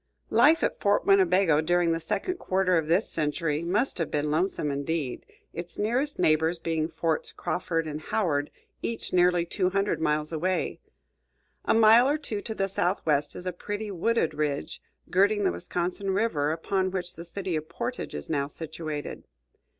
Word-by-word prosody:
Life 320 +3 +5
at - - 0
Fort 205 0 +2
Winnebago 185 -5 +4
during 175 +1 +2
the 165 - 0
second 365 - -2
quarter 185 - +1
of 160 -2 +1
this 175 +7 +4
century 155 0 +1
must 195 +7 0
have 165 - -1
been 150 0 -1
lonesome 160 -2 0
indeed, 140 -1 -3 0.3
its 170 +1 -7
nearest 250 +7 0
neighbors 160 +2 +2
being 160 -1 -1
Forts 160 -1 -1
Crawford 165 -2 -2
and 155 0 -5
Howard, 155 -6 0 0.3
each 230 - -4
nearly 175 -1 +4
two 185 +1 0
hundred 195 -2 0
miles 150 +1 0
away. 180 +4 -1 0.9
A - - +3
mile 225 +3 +6
or 295 - +2
two 225 -9 -4
to 220 0 -5
the 195 - 0
southwest 160 -6 0
is 180 - -3
a 180 - -2
pretty 205 +4 -5
wooded 210 +2 0
ridge, 145 - -3 0.3
girting 205 +3 +3
the 190 - +3
Wisconsin 180 +3 -3
River, 190 -8 +1
upon 185 +4 -1
which 180 -1 -4
the 170 - -8
city 180 0 -4
of 155 +1 -4
Portage 170 - -4
is 75 - -4
now 140 -3 -1
situated. 155 -1 -6
175 Hz, 165 wpm, -27 LUFS, 155-195 Hz, 0.9 s, mile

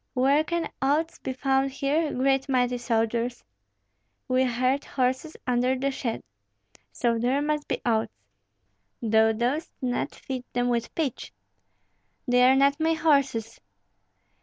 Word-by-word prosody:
"Where 275 +4 +3
can 340 +1 -2
oats 300 +5 0
be - - -4
found 270 +1 +1
here, 290 +4 0
great 270 +1 +1
mighty 250 -1 +1
soldiers?" 235 0 -1 0.8
"We 255 0 +2
heard 255 +3 0
horses 260 +4 -2
under 250 +1 +1
the 275 +2 -1
shed, 240 -4 -4 0.7
so 235 -2 0
there 250 +4 +1
must 300 0 -1
be - - -3
oats; 220 - +1 0.9
thou 220 -1 +3
dost 245 +9 -1
not 250 -2 -2
feed 260 -2 -6
them 245 0 +1
with 235 -1 -2
pitch." 295 -7 -3 1.0
"They 250 0 +4
are 265 - +5
not 280 +2 +3
my 320 +1 +2
horses." 275 -8 +1
260 Hz, 135 wpm, -26 LUFS, 245-280 Hz, 1.0 s, are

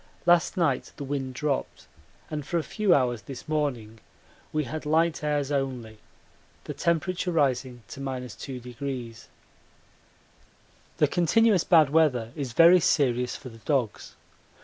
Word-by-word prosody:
Last 175 +2 +3
night 155 -7 0
the - - -6
wind 135 -2 -4
dropped, 145 0 -3 0.5
and 150 -1 -3
for 170 - -2
a 165 - 0
few 210 +2 0
hours 125 -7 +2
this 130 +7 -10
morning 125 -8 -2 0.5
we 155 0 0
had 155 +4 -6
light 160 +1 +1
airs 145 -2 -1
only, 125 -6 -3 0.6
the - - -6
temperature 180 +2 -1
rising 130 -6 0
to - - -9
2°. 125 -2 -6 1.7
The - - +4
continuous 190 +2 +3
bad 155 -5 +5
weather 130 -8 +2
is 135 -6 -5
very 170 +6 +7
serious 125 -6 +1
for 130 - -9
the 115 -1 -14
dogs. 125 -3 -2
140 Hz, 130 wpm, -26 LUFS, 125-160 Hz, 1.7 s, very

